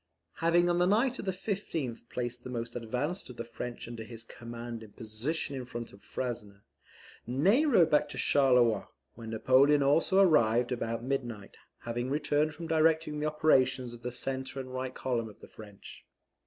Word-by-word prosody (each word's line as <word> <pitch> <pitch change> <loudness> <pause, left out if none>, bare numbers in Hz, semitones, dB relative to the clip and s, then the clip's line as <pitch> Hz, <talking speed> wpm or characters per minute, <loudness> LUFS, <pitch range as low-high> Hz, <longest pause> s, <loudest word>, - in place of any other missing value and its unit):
Having 170 +1 +3
on 175 0 +2
the 180 - +4
night 235 +6 +2
of - - -5
the 190 - +1
15th 165 - -4
placed 120 0 -4
the - - -7
most 120 -1 -4
advanced 125 - -3
of 125 - -10
the 115 - -3
French 120 0 -6
under 115 -1 -7
his 115 0 -8
command 115 0 -8
in 110 -2 -13
position 125 +7 -3
in 130 - -4
front 120 -1 -7
of 100 - -16
Frasne, 105 -6 -5 0.7
Ney 190 - +3
rode 180 - +5
back 150 - +3
to - - -7
Charleroi, 125 -7 +3 0.3
where 115 -1 -10
Napoleon 135 +6 +4
also 165 +7 +3
arrived 125 - +4
about 115 -1 -2
midnight, 120 -6 -4 0.3
having 120 +2 -3
returned 150 +1 +1
from 170 - -7
directing 160 -1 +2
the 150 - 0
operations 130 -5 +2
of 120 - -11
the 125 +1 -4
centre 130 +2 -3
and 130 -1 -7
right 130 0 -4
column 120 -4 -2
of 105 - -16
the - - -13
French. 105 -2 -12
130 Hz, 180 wpm, -30 LUFS, 115-155 Hz, 0.7 s, rode